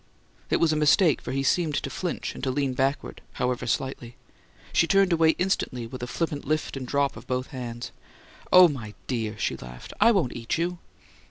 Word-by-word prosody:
It -, -, +2 dB
was 160 Hz, -2 st, +3 dB
a -, -, 0 dB
mistake, 155 Hz, +2 st, +4 dB
for -, -, -5 dB
he 135 Hz, +1 st, -1 dB
seemed 155 Hz, +1 st, +1 dB
to -, -, -2 dB
flinch, 180 Hz, -2 st, -3 dB
and -, -, -10 dB
to 130 Hz, -, 0 dB
lean 135 Hz, 0 st, 0 dB
backward, 135 Hz, +2 st, -1 dB
however, 125 Hz, -1 st, -1 dB
slightly. 120 Hz, -1 st, -3 dB, 0.6 s
She 165 Hz, -, +4 dB
turned 195 Hz, -1 st, +4 dB
away 160 Hz, -1 st, +4 dB
instantly, 155 Hz, -10 st, -1 dB
with 125 Hz, +2 st, -8 dB
a 125 Hz, -, -3 dB
flippant 145 Hz, +2 st, -2 dB
lift 155 Hz, +1 st, -1 dB
and 130 Hz, -2 st, -5 dB
drop 140 Hz, +1 st, +1 dB
of -, -, -11 dB
both 125 Hz, 0 st, -2 dB
hands. 120 Hz, -2 st, -6 dB, 0.6 s
"Oh, 180 Hz, 0 st, +9 dB
my 115 Hz, -9 st, -6 dB
dear!" 115 Hz, -4 st, -3 dB
she -, -, -1 dB
laughed. 60 Hz, 0 st, -10 dB
"I 230 Hz, +3 st, +7 dB
won't 190 Hz, -, +1 dB
eat 115 Hz, +4 st, -2 dB
you!" 175 Hz, +1 st, -2 dB
135 Hz, 195 wpm, -26 LUFS, 125-165 Hz, 0.6 s, Oh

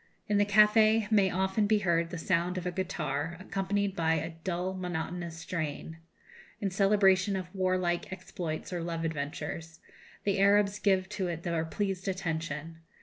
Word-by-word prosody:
In 205 Hz, -1 st, +2 dB
the 205 Hz, -, +3 dB
café 215 Hz, +1 st, +5 dB
may 200 Hz, -3 st, +5 dB
often 190 Hz, +3 st, +1 dB
be 215 Hz, 0 st, +4 dB
heard 170 Hz, -4 st, +1 dB
the 175 Hz, -, -5 dB
sound 175 Hz, +1 st, 0 dB
of 180 Hz, -, -4 dB
a 180 Hz, -, -1 dB
guitar, 165 Hz, -3 st, -2 dB
accompanied 195 Hz, +1 st, -1 dB
by 165 Hz, -2 st, +2 dB
a 160 Hz, +1 st, -3 dB
dull 180 Hz, +1 st, -2 dB
monotonous 175 Hz, -2 st, -4 dB
strain, 160 Hz, -1 st, -4 dB, 0.6 s
in 200 Hz, -3 st, -1 dB
celebration 195 Hz, 0 st, +4 dB
of 180 Hz, -1 st, -5 dB
warlike 185 Hz, -2 st, 0 dB
exploits 180 Hz, -3 st, -5 dB
or 175 Hz, -, -2 dB
love 165 Hz, -1 st, -3 dB
adventures; 160 Hz, +2 st, -4 dB, 0.4 s
the 200 Hz, -1 st, +1 dB
Arabs 200 Hz, +1 st, +4 dB
give 190 Hz, -2 st, +2 dB
to 205 Hz, -3 st, -2 dB
it 170 Hz, -1 st, -4 dB
their 170 Hz, -2 st, 0 dB
pleased 195 Hz, +2 st, -3 dB
attention. 165 Hz, -3 st, -3 dB
185 Hz, 155 wpm, -30 LUFS, 165-195 Hz, 0.6 s, café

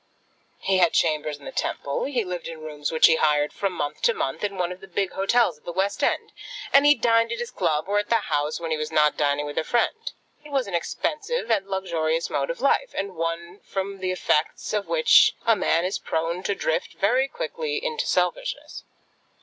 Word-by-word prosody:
He 190 Hz, -1 st, +1 dB
had 175 Hz, -2 st, +4 dB
chambers 155 Hz, -2 st, +1 dB
in 145 Hz, -, -16 dB
the -, -, -6 dB
Temple; 140 Hz, -, -2 dB
he 255 Hz, -5 st, -1 dB
lived 180 Hz, -3 st, -5 dB
in 165 Hz, -1 st, -7 dB
rooms 150 Hz, -2 st, -4 dB
which 160 Hz, -, +5 dB
he 160 Hz, -, +6 dB
hired 150 Hz, -1 st, +2 dB
from 195 Hz, -1 st, -1 dB
month 150 Hz, -3 st, -4 dB
to 235 Hz, -, +3 dB
month 135 Hz, -, -3 dB
in 200 Hz, -2 st, -2 dB
one 180 Hz, -1 st, -1 dB
of 180 Hz, -, -9 dB
the 195 Hz, -, -11 dB
big 190 Hz, +1 st, -1 dB
hotels 195 Hz, -4 st, +2 dB
at -, -, -37 dB
the -, -, -5 dB
West 195 Hz, +3 st, -1 dB
End; -, -, 0 dB, 0.4 s
and 280 Hz, +1 st, +7 dB
he 295 Hz, -, +7 dB
dined 230 Hz, 0 st, +2 dB
at 235 Hz, -, -2 dB
his 240 Hz, +1 st, -5 dB
club, 155 Hz, -9 st, 0 dB
or 205 Hz, +1 st, +2 dB
at 205 Hz, -, -4 dB
the 235 Hz, -, +4 dB
House, 150 Hz, -8 st, -1 dB
when 165 Hz, -1 st, -4 dB
he 155 Hz, -, +1 dB
was 155 Hz, 0 st, -4 dB
not 150 Hz, -1 st, +3 dB
dining 145 Hz, 0 st, 0 dB
with 145 Hz, 0 st, -3 dB
a -, -, -1 dB
friend. 240 Hz, -, 0 dB, 0.3 s
It 300 Hz, -, -12 dB
was 270 Hz, -2 st, +1 dB
an 200 Hz, -, -8 dB
expensive 320 Hz, -, -2 dB
and 200 Hz, -3 st, +1 dB
a -, -, -20 dB
luxurious 165 Hz, -4 st, -1 dB
mode -, -, -1 dB
of -, -, -4 dB
life, -, -, +1 dB
and 195 Hz, -1 st, -3 dB
one 165 Hz, +3 st, -4 dB
from 195 Hz, 0 st, -4 dB
the 185 Hz, -1 st, -1 dB
effects 165 Hz, 0 st, 0 dB
of 210 Hz, -1 st, -1 dB
which 485 Hz, -2 st, +5 dB
a 230 Hz, -, +5 dB
man 170 Hz, -4 st, +1 dB
is 190 Hz, -, -2 dB
prone 165 Hz, +2 st, -2 dB
to 200 Hz, -, 0 dB
drift 160 Hz, 0 st, -2 dB
very 250 Hz, +7 st, +2 dB
quickly 475 Hz, -, -4 dB
into 470 Hz, +1 st, -2 dB
selfishness. -, -, -1 dB
190 Hz, 220 wpm, -24 LUFS, 160-235 Hz, 0.4 s, and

